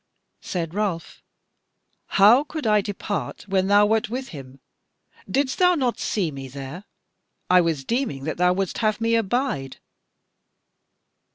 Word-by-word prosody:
Said 170 -3 -4
Ralph: 195 -5 -3 1.0
"How 215 +8 +7
could 305 -1 -6
I 210 -1 +4
depart 205 0 -4
when 190 -1 +1
thou 205 +1 +5
wert 220 0 +1
with 260 +3 -5
him? 135 -3 -11 0.7
Didst 265 +5 0
thou 360 -1 +5
not 255 -6 -1
see 185 -7 -1
me 135 -1 -8
there? 140 +8 -8 0.7
I 180 0 +7
was 160 -5 -1
deeming 235 - -2
that 155 - -3
thou 180 +1 +3
wouldst 190 0 -2
have 215 -1 +1
me 230 0 +1
abide." 225 - -1
200 Hz, 135 wpm, -23 LUFS, 165-230 Hz, 1.0 s, How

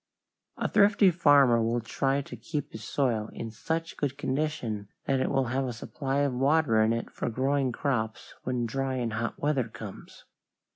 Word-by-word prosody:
A - - 0
thrifty 200 -2 +5
farmer 145 -8 +5
will 115 +2 +1
try 135 +4 0
to - - -9
keep 150 -4 -4
his 110 - -8
soil 115 -3 0
in 115 - -6
such 165 +8 -3
good 140 -1 -2
condition 130 -8 -2 0.2
that 135 -1 +1
it - - +1
will 135 -1 +1
have 135 +1 +1
a 125 - -3
supply 135 +4 -2
of 140 -2 +1
water 135 -3 +3
in 110 +1 +3
it 115 0 -2
for - - -3
growing 130 +2 +1
crops 120 -3 -2
when 125 -2 -1
dry 135 +3 -2
and 120 -3 -2
hot 115 +1 -2
weather 140 -5 0
comes. 105 -3 -10
130 Hz, 180 wpm, -28 LUFS, 115-145 Hz, 0.2 s, thrifty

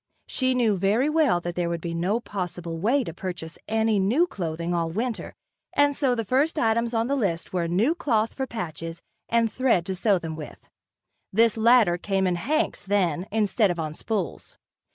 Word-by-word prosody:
She 255 -1 0
knew 225 -5 +2
very 215 +10 +2
well 305 - +3
that 175 0 -4
there 175 -1 -1
would 170 0 -2
be 170 +1 -4
no 180 +7 0
possible 175 -6 -5
way 250 +9 +2
to 165 - -6
purchase 175 -2 -6
any 220 -1 +2
new 235 - +3
clothing 170 - -3
all 165 -1 0
winter 225 +6 -3 0.4
and 285 0 +3
so 265 -4 +1
the 225 -2 -2
first 275 +9 +1
items 230 -2 +1
on 225 0 +2
the 275 +3 0
list 190 -11 -2
were: 175 -2 0
new 205 - +2
cloth 230 -10 0
for 265 -1 -3
patches 165 -6 -6 0.3
and 230 -1 +2
thread 250 -10 +2
to 190 - -2
sew 195 +1 +2
them 160 -2 -5
with. 155 -1 -8 0.7
This 225 +3 +4
latter 225 -6 +4
came 195 0 0
in 180 - +2
"hanks" 305 - -1
then, 185 -3 0
instead 210 0 +2
of 175 - -2
on 155 -2 -3
spools. 200 +1 -4
205 Hz, 190 wpm, -25 LUFS, 175-235 Hz, 0.7 s, This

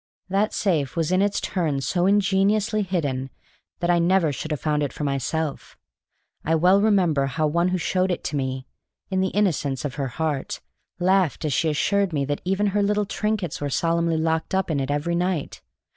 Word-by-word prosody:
That 200 +3 +1
safe 160 -9 0
was 165 0 0
in 185 +1 +3
its 205 0 +1
turn 160 -7 -1
so 175 +6 +1
ingeniously 205 +2 +2
hidden 145 -9 -2 0.5
that 175 0 +2
I 175 - +3
never 170 -2 +3
should 155 - -5
have 150 -3 -2
found 150 -1 0
it 145 -3 -1
for 150 - -6
myself. 140 +2 -2 0.7
I 160 - +1
well 180 +5 +4
remember 180 -10 +3
how 155 +4 -1
one 170 +4 +1
who 185 0 0
showed 185 +2 0
it 180 - -2
to - - -3
me 130 -1 -2 0.5
(in 190 0 +1
the 190 - +2
innocence 155 -10 0
of 140 - -3
her 135 - -1
heart) 145 +1 -3 0.4
laughed 185 -3 +1
as 150 - 0
she 165 +2 +1
assured 195 +5 +1
me 140 -2 0
that 145 +1 -3
even 195 +3 0
her 205 - +2
little 210 +1 +1
trinkets 210 -6 -2
were 145 - -1
solemnly 165 +2 +1
locked 160 +2 0
up 190 -3 0
in 145 - 0
it 135 0 -2
every 145 +4 -1
night. 175 -3 -2
170 Hz, 195 wpm, -24 LUFS, 145-190 Hz, 0.7 s, well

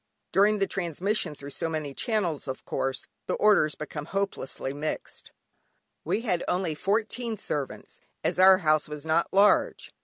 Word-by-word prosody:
During 210 +2 +4
the 195 - +2
transmission 180 -1 -1
through 140 0 -9
so 165 +4 -1
many 155 -3 -3
channels, 185 - -1
of 130 - -5
course 135 -1 -2 0.2
the - - 0
orders 200 -8 +4
become 150 -1 -6
hopelessly 195 -8 -3
mixed. 150 +2 -5 0.7
We 220 - 0
had 180 -7 0
only 180 -3 0
fourteen 220 +6 -1
servants, 145 -7 -5 0.2
as - - 0
our 190 0 +8
house 155 -4 +2
was 150 0 -7
not 160 +2 +1
large! 200 +2 +3
170 Hz, 150 wpm, -27 LUFS, 150-200 Hz, 0.7 s, our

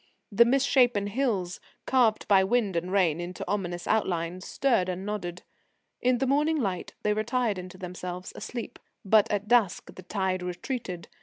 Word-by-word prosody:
The 235 +4 +6
misshappen 245 -4 +3
hills, 200 -7 -1 0.3
carved 240 -5 +2
by 195 -2 +5
wind 210 -2 +1
and 175 +2 -2
rain 175 -5 +2
into 175 +1 -6
ominous 175 -4 -2
outlines, 180 -4 -1
stirred 235 -9 +1
and 185 +1 -4
nodded. 180 -4 -4 0.6
In 250 0 +3
the 265 - 0
morning 300 +4 +2
light 190 -7 -3
they 210 - +2
retired 215 -1 0
into 180 0 -9
themselves, 180 0 -6
asleep. 240 -2 -6 0.3
But 215 +2 +5
at 205 0 -1
dusk 225 -5 +2
the - - -10
tide 190 0 -1
retreated. 180 0 -5
200 Hz, 155 wpm, -27 LUFS, 180-235 Hz, 0.6 s, The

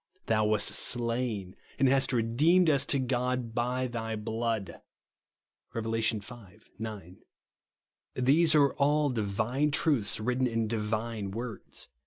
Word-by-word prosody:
Thou 110 -1 +2
wast 105 -1 +2
slain, 115 -5 0 0.2
and 135 - +3
hast 135 0 +2
redeemed 150 +9 +3
us 140 -1 +2
to 140 - +3
God 125 -2 -1
by 125 +2 -1
thy 115 -2 -4
blood," 110 -1 -3 0.9
(Rev. 115 -1 -3
V. 115 -1 0 0.6
9). 105 -5 -7 1.0
These 155 +6 +3
are 140 -2 +4
all 145 0 +2
divine 115 +6 0
truths 140 -9 +1
written 125 +3 0
in 115 -2 -1
divine 110 -1 -3
words. 115 +2 -7
120 Hz, 120 wpm, -29 LUFS, 110-130 Hz, 1.0 s, are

